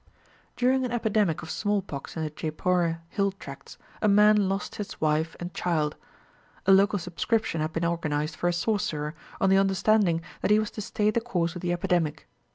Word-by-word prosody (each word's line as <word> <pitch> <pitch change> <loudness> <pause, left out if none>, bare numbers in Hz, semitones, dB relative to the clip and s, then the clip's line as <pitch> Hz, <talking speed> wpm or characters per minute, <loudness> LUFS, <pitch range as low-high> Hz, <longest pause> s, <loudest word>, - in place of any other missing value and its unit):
During 260 +1 +2
an 250 - -2
epidemic 215 -8 +1
of 160 - -6
smallpox 195 -9 -2
in 160 - -1
the 155 - -3
Jeypore 165 +2 -1
hill 200 +1 0
tracts, 195 - -11 0.2
a 215 - +3
man 210 -1 +5
lost 195 +1 -3
his 205 -1 -6
wife 155 +1 +1
and 175 +1 -6
child. 155 -4 0 0.7
A 195 - +5
local 200 +2 +5
subscription 180 0 -1
had 155 +1 -1
been 165 +1 -1
organised 155 -2 -1
for 175 - -1
a 175 - +2
sorcerer, 170 -6 -1 0.3
on 195 - +3
the 195 - +6
understanding 195 -3 +2 0.2
that - - 0
he 210 - +6
was 215 -1 -1
to 215 - -6
stay 210 +1 0
the 235 - 0
course 175 -8 -1
of 175 - -6
the 175 - -1
epidemic. 175 -4 0
180 Hz, 185 wpm, -27 LUFS, 165-210 Hz, 0.7 s, the